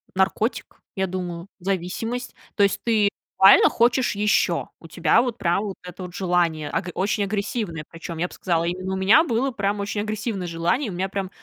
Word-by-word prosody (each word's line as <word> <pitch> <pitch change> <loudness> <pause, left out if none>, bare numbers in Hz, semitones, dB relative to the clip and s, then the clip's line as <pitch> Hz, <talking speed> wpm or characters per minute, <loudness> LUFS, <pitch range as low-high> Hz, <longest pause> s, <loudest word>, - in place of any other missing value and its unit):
наркотик, 195 +5 -1
я 190 0 0
думаю, 175 -1 -5
зависимость. 195 +7 -3 0.2
То 205 - +3
есть 200 - +1
ты 215 -3 +3 0.3
буквально 195 +1 +8
хочешь 240 0 +2
еще, 205 -4 +1
у 165 - -13
тебя 165 +7 +3
вот 245 -2 -3
прям 175 +3 +1
вот 200 -3 -4
это 180 +1 -9
вот 180 -1 -8
желание, 175 -5 0
аг 180 - -2
очень 200 +2 0
агрессивное, 200 -5 -3
причем, 165 0 -8
я 175 +2 0
б - - -15
сказала, 170 -3 0
именно 185 +2 -3
у - - -1
меня 205 +12 +5
было 260 -1 0
прям 205 -2 -1
очень 205 +1 -2
агрессивное 215 -3 -3
желание. 170 - 0
И - - -3
у 190 - -6
меня 185 +2 -2
прям 195 -1 -3
195 Hz, 195 wpm, -23 LUFS, 175-215 Hz, 0.3 s, буквально